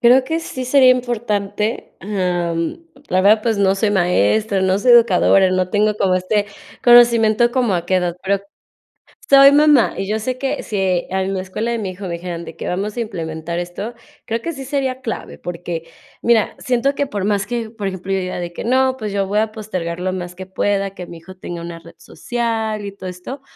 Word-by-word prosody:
Creo 250 +2 +5
que 320 +3 -2
sí 260 -5 -6
sería 260 0 +5
importante, 215 -4 -1
em, 175 - -2 0.3
la 185 - +2
verdad, 215 +2 +5
pues, 225 -3 0
no 195 -1 +3
soy 205 +1 0
maestra, 190 - +2
no 190 +1 +2
soy 245 +3 +4
educadora, 195 -4 +5
no 185 0 0
tengo 210 +1 +2
como 190 -3 +2
este 200 +3 0 0.4
conocimiento 235 -1 +5
como 240 -6 +1
a 170 -1 -1
qué 185 - +2
edad, 175 -1 -1
pero, 195 0 0 0.9
soy 275 0 +8
mamá 295 -3 +5
y 195 0 -3
yo 215 - 0
sé 255 +3 -3
que 270 0 -2
si 190 -4 0
en 190 0 -1
la 185 - -2
escuela 200 +5 -4
de 235 - -1
mi 205 -4 -3
hijo 190 +2 -9
me 170 - -4
dijeran 170 -1 -5
de - - -10
que: - - -6
"Vamos 200 +5 -3
a - - -1
implementar 170 -5 -4
esto, 185 +7 -5 0.3
creo 230 +1 -2
que 335 - -4
sí 270 -1 -8
sería 265 -1 -2
clave 230 -3 -5
porque, 170 -1 -6 0.4
mira, 230 -2 +2
siento 255 +3 0
que 285 - 0
por 200 -5 -3
más 205 0 0
que, 230 -1 -3
por 215 -3 -5
ejemplo, 190 0 -5
yo 195 - +2
diga 185 -1 -4
de 175 -1 -5
que, - - -6
no 260 +2 +2
pues, 215 -4 -4
yo 195 -1 -1
voy 205 +2 -1
a 220 0 0
postergar 185 -6 -5
lo 185 +1 -2
más 180 -1 -5
que 190 0 -9
pueda, 195 0 -1
que 180 - -7
mi 170 - -10
hijo 185 +3 -13
tenga 175 -2 -7
una 170 0 -7
red 170 0 -15
social 225 -3 -3
y 200 - -5
todo 190 -1 -9
esto, 180 +10 -8
205 Hz, 215 wpm, -19 LUFS, 185-235 Hz, 0.9 s, soy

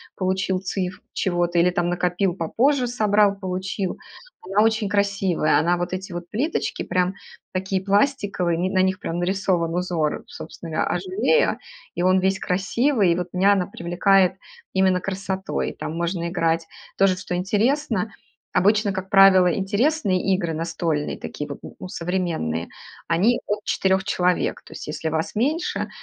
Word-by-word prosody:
получил 190 0 0
цифру 185 -1 -4
чего-то, 175 -2 0
или 180 +1 +4
там 175 -1 0
накопил 180 +1 0
попозже, 250 - +1
собрал, 210 -4 +3
получил. 185 0 -3 0.5
Она 205 +2 +3
очень 220 -2 +1
красивая, 200 -5 +1
она 175 +2 +2
вот 175 0 -3
эти 185 0 -5
вот 175 0 -6
плиточки 275 +10 -2
прям 185 +1 0 0.4
такие 190 0 -1
пластиковые, 200 -5 +1
на 190 -1 +3
них 190 0 0
прям 165 - -4
нарисован 175 -2 0
узор, 175 -4 -1
собственно - - -9
говоря, - - 0 0.6
Azulejo, - - -11 0.4
и - - -2
он 185 +1 +4
весь 190 +1 +1
красивый, 205 +2 +1
и - - +2
вот 180 -1 -4
меня 195 +3 +4
она 190 -3 +1
привлекает 185 +2 +2 0.4
именно 190 -1 +3
красотой. 190 0 -3
Там 160 - -5
можно 170 0 -2
играть. 165 -2 0 0.3
Тоже, 195 -1 +3
что 180 -1 -4
интересно, 220 +3 0 0.4
обычно, 205 +1 +3
как 190 0 -5
правило, 190 -3 +6
интересные 205 - +1
игры 170 -4 -2
настольные, 165 -2 -2
такие 150 0 -6
вот, 140 - -6 0.2
ну, 185 - -6
современные, 165 - -2 0.4
они 195 +9 +2
от 205 0 -2
4 190 0 +1
человек. 180 -2 0
То - - -16
есть - - -8
если 160 +1 -3
вас 160 +3 -2
меньше, 300 +10 -1
185 Hz, 150 wpm, -23 LUFS, 175-200 Hz, 0.6 s, правило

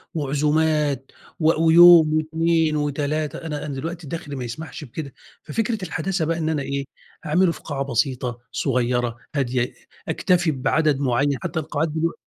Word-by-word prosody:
وعزومات 150 -1 0 0.3
و 160 0 +3
ويوم 165 -1 +8
و2 160 0 +1
و3، 150 +1 -1
أنا 150 -2 -4
أنا 145 - -4
دلوقتي 165 +4 -5
دخْلي 160 -2 -6
ما 130 - -4
يسمحش 125 +7 -7
بكده، 140 +1 -7 0.3
ففكرة 225 -2 -2
الحداثة 165 0 -2
بَقى 165 +1 -1
إن 160 -1 -1
أنا 155 -3 0
إيه 140 0 -3 0.4
أعمله 175 +3 +3
في - - -8
قاعة 140 -3 -3
بسيطة، 125 -1 -1
صغّيرة، 120 -3 0 0.2
هادية، 125 -3 0 0.3
أكتفي 175 -2 +2
بعدد 150 +1 +1
معيّن، 140 +1 +1
حتى 160 - -2
القاعات 155 +1 -2
دلوق 160 +2 -1
150 Hz, 145 wpm, -22 LUFS, 135-160 Hz, 0.4 s, ويوم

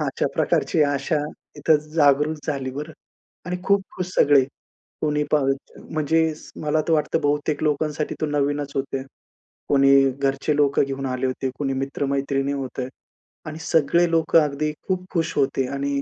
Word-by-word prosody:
अशा - - -1
प्रकारची 160 -4 +2
आशा 145 +2 0 0.4
इथं 155 - +4 0.2
जागृत 150 0 +3
झाली 135 -3 -2
बरं 150 +4 -6 0.5
आणि 180 0 -2
खूप 200 0 +3
खुश 180 - -2
सगळे. 140 -2 +5 0.6
कोणी 150 -1 +1
पाह 150 -2 +3 0.5
म्हणजे 160 +1 +1 0.3
मला 155 +1 +1
तर - - +3
वाटतं 150 -2 +1
बहुतेक 145 +1 0
लोकांसाठी 150 0 -1
तो 155 - +1
नवीनच 145 -1 -1
होते. 135 -1 -2 0.7
कुणी 135 -1 +5
घरचे 135 +2 0
लोकं 145 -1 +3
घेऊन 135 0 -4
आले 130 0 -2
होते, 130 +1 -2
कुणी 135 -2 -1
मित्र-मैत्रिणी 135 +1 -1
होते. 130 -2 -4 0.6
आणि 155 0 -6
सगळे 165 +2 +3
लोकं 165 0 +4
अगदी 150 +1 -1 0.2
खूप 185 -1 -1
खुश 165 -1 0
होते 135 -2 +1
आणि 140 0 -1
145 Hz, 145 wpm, -23 LUFS, 135-155 Hz, 0.7 s, सगळे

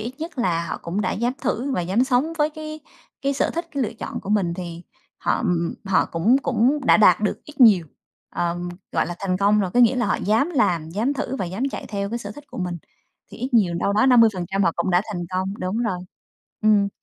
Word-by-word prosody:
ít 235 +4 -5
nhất 325 -3 -7
là 170 -7 0
họ - - -4
cũng 175 +5 -2
đã 210 - 0
dám 240 +3 0
thử 265 +4 -1
và 180 - 0
dám 190 +8 +1
sống 265 +5 +1
với 300 +1 +2
cái 310 0 -8 0.4
cái 275 - +1
sở 275 - 0
thích, 335 +1 -4
cái 280 -2 -1
lựa 225 - -2
chọn - - -6
của 200 - -7
mình, 185 -5 +1
thì 175 -2 -7 0.4
họ, - - 0
ừm, 230 - -1
ừm, 170 0 -2
họ 190 -1 +2
cũng 210 +11 +3
cũng 260 +4 +2
đã - - +7
đạt 210 -2 +5
được 210 - -2
ít 300 -1 -13
nhiều, 200 -9 +7 0.4
ờm, 175 +1 -2 0.2
gọi - - +1
là, 175 - -4
thành 185 -2 -1
công 205 +2 +3
rồi. 190 -3 -1
Có 245 - +5
nghĩa 245 +2 +5
là 245 - +1
họ - - +1
dám 225 - +1
làm, 170 - +1
dám 220 +9 0
thử, 270 -1 -3
và 190 - -2
dám 190 +7 -5
chạy - - -6
theo 200 -1 -3
cái 235 - -2
sở 205 -3 -7
thích 290 +2 -12
của - - -8
mình 180 -1 -2 0.5
thì - - -11
ít 250 +3 -3
nhiều 190 -7 +3
đâu 200 +4 0
đó 215 +5 +3
50% 200 -6 +3
họ 170 - +3
cũng 170 +2 0
đã 180 +1 +3
thành 175 -3 -4
công, 190 +1 -2
đúng 185 +4 -2
rồi. 190 -6 -1 0.6
Ừm. 210 -2 +4
210 Hz, 245 wpm, -23 LUFS, 180-250 Hz, 0.6 s, đã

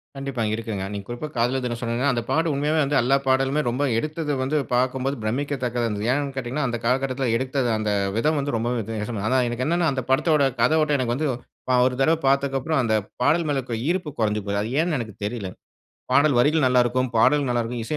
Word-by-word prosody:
கண்டிப்பா 135 -4 -3
இருக்குங்க. 110 -4 -4
நீங்க 100 -1 -6
குறிப்பா 120 +5 -5
காதலர் 125 +3 +1
தினம் 120 -1 -3
சொன்னீங்கன்னா 120 +4 0
அந்த 120 - -1
பாட்டு 160 0 +1
உண்மையாவே 150 +3 +1
வந்து 145 +1 +1
எல்லா 125 +3 +3
பாடலுமே 135 +3 +2
ரொம்ப 125 +4 -1
எடுத்தது 155 +3 -2
வந்து 150 +4 0 0.2
பார்க்கும்போது 130 +2 0
பிரமிக்கத்தக்கதா 125 0 -1
இருந்தது. 105 0 -3
ஏன்னு 140 0 -1
கேட்டீங்கன்னா, 130 +3 -2
அந்த 120 - -2
காலகட்டத்தில 130 +1 0
எடுத்தது 130 -1 -1
அந்த 110 -1 -1 0.3
விதம் 155 +5 +1
வந்து 140 -3 -2
ரொம்பவே 120 +2 -1
வித்தியாசம 110 0 -4
ஆனா 130 +2 +2
எனக்கு 120 +2 -2
என்னன்னா 170 0 +2
அந்த 135 -1 -2
படத்தோட 150 +2 +3 0.2
கதை 140 +7 +4
ஓட்டம் 150 -1 +2
எனக்கு 120 -1 0
வந்து 155 +4 -1 0.5
அ - - +5
ஒரு 130 0 +1
தடவை 160 +4 +3
பார்த்ததுக்கு 135 0 +2
அப்புறம் 155 +2 0
அந்த 110 -2 0 0.3
பாடல் 160 +6 +3
மேல 145 -2 0
இருக்கிற 120 -3 -4
ஈர்ப்பு 175 -2 0
குறைஞ்சு 105 -1 +1
போகுது. 100 0 -2
அது 110 - -3
ஏன்னு 170 -2 0
எனக்கு 115 -4 -5
தெரியல. 105 -2 -3 0.6
பாடல் 140 +2 +4
வரிகள் 150 +4 +3
நல்லா 125 -1 +4
இருக்கும். 130 +2 0
பாடல் 140 +5 +4
நல்லா 120 -1 +1
இருக்கும். 120 +1 -4
இசை 150 - -3
130 Hz, 205 wpm, -23 LUFS, 120-145 Hz, 0.6 s, அ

